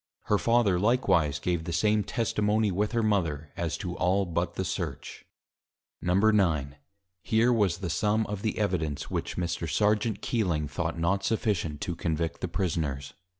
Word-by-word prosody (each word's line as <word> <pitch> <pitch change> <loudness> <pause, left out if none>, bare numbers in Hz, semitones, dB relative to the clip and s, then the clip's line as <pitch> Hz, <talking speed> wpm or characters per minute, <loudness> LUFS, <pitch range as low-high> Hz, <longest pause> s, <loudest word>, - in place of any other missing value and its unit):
Her 105 - +1
Father 115 -6 +3
likewise 90 - +2
gave 85 +2 -1
the 85 - -3
same 105 +4 +2
Testimony 105 -1 0
with 105 +4 0
her 115 -1 +1
Mother; 80 -9 0
as 85 -2 -2
to - - -5
all 95 +2 +2
but 85 0 -2
the 95 - -2
Search. - - -5 0.8
IX. 90 -6 +3 0.5
Here 115 +2 +3
was 100 -7 +2
the 95 -2 -4
Sum 105 +6 +1
of 105 -1 -5
the 110 - -2
Evidence: 85 -9 -1
Which - - -3
Mr. 85 -2 -2
Serjeant 105 +3 +1
Keeling, 85 -10 0
thought 80 +4 -3
not 85 +4 +1
sufficient 85 -9 -1
to 90 - -2
Convict 80 -1 -2
the - - -1
Prisoners. 70 -7 -2
90 Hz, 155 wpm, -28 LUFS, 80-105 Hz, 0.8 s, Father